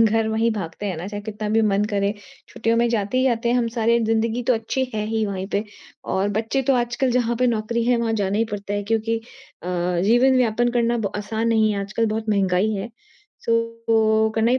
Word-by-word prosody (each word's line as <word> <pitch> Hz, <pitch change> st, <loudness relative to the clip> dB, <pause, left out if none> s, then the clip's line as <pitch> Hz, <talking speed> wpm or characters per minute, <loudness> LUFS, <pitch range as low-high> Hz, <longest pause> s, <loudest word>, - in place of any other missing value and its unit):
घर 225 Hz, 0 st, +2 dB
मे 220 Hz, -, -1 dB
ही 230 Hz, -, +3 dB
भागते 205 Hz, -1 st, -5 dB
हैं 190 Hz, -4 st, -2 dB
ना, 170 Hz, +4 st, -6 dB
चाहे 205 Hz, 0 st, -5 dB
कितना 210 Hz, 0 st, -5 dB
भी 220 Hz, +1 st, +3 dB
मन 205 Hz, -1 st, +2 dB
करे, 200 Hz, 0 st, +1 dB, 0.4 s
छुट्टियों 230 Hz, 0 st, 0 dB
में 235 Hz, +1 st, +3 dB
जाते 225 Hz, +1 st, 0 dB
ही 260 Hz, -, +3 dB
आते 230 Hz, +1 st, -3 dB
हैं 245 Hz, -, +3 dB
हम 240 Hz, -1 st, +1 dB
सारे। 230 Hz, 0 st, +2 dB
जिंदगी 225 Hz, +2 st, 0 dB
तो 250 Hz, +1 st, +2 dB
अच्छी 225 Hz, +4 st, -1 dB
है 210 Hz, -1 st, -1 dB
ही 220 Hz, 0 st, 0 dB
वहीं 190 Hz, -1 st, -4 dB
पे 205 Hz, +2 st, 0 dB, 0.5 s
और 190 Hz, +2 st, +1 dB
बच्चे 230 Hz, +5 st, 0 dB
तो 270 Hz, +1 st, +2 dB
आजकल 245 Hz, +2 st, 0 dB
जहाँ 240 Hz, -1 st, +1 dB
पे 250 Hz, -, +3 dB
नौकरी 230 Hz, 0 st, 0 dB
है 245 Hz, +1 st, +3 dB
वहाँ 230 Hz, -1 st, 0 dB
जाना 200 Hz, +2 st, 0 dB
ही 225 Hz, -, +3 dB
पड़ता 205 Hz, 0 st, -5 dB
है। 205 Hz, -, -1 dB
क्योंकि 225 Hz, +1 st, 0 dB, 0.5 s
अ, -, -, -8 dB, 0.4 s
जीवन-यापन 240 Hz, +1 st, +3 dB
करना 240 Hz, -1 st, +1 dB
ब 200 Hz, -3 st, -2 dB
आसान 220 Hz, +2 st, -2 dB
नहीं 220 Hz, -1 st, +3 dB
है, 200 Hz, -, -2 dB
आजकल 215 Hz, +3 st, -1 dB
बहुत 220 Hz, +1 st, -3 dB
महँगाई 195 Hz, 0 st, +2 dB
है 200 Hz, +4 st, -4 dB, 0.6 s
सो 230 Hz, -, +2 dB, 0.7 s
ओ -, -, -1 dB
करना 225 Hz, +1 st, +2 dB
ही 255 Hz, -, +3 dB
225 Hz, 225 wpm, -22 LUFS, 205-235 Hz, 0.7 s, ही